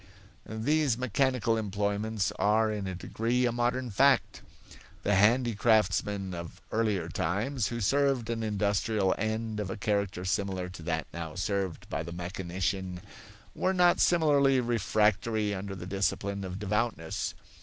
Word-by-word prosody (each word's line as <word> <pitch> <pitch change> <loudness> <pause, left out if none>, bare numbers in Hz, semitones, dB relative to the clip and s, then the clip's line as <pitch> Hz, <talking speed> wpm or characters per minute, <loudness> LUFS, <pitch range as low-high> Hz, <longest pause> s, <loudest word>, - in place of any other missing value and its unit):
These 130 +4 +1
mechanical 125 -2 +1
employments 105 0 -1
are 110 +1 +3
in 105 -2 -3
a 95 - -4
degree 115 +7 0
a 120 - +2
modern 120 +1 -1
fact. 135 +5 +3 0.6
The 105 - +2
handicraftsmen 105 -3 +2
of 85 -1 -7
earlier 105 -6 0
times, 100 - -1
who 120 - -4
served 135 +1 +2
an 115 -1 -2
industrial 105 -1 +1
end 110 0 -2
of 105 -3 -3
a - - -4
character 100 -3 -1
similar 95 -1 -1
to 90 -2 -10
that 80 -2 -2
now 80 0 -6
served 95 -2 -2
by - - -3
the 85 +1 -6
mechanician, 90 +1 -3 0.5
were 190 +1 0
not 180 -1 +4
similarly 145 -6 +4
refractory 110 -2 +1
under 100 0 -5
the 90 -1 -7
discipline 100 +1 -1
of 95 0 -5
devoutness. 105 -4 -2
105 Hz, 135 wpm, -29 LUFS, 95-115 Hz, 0.6 s, not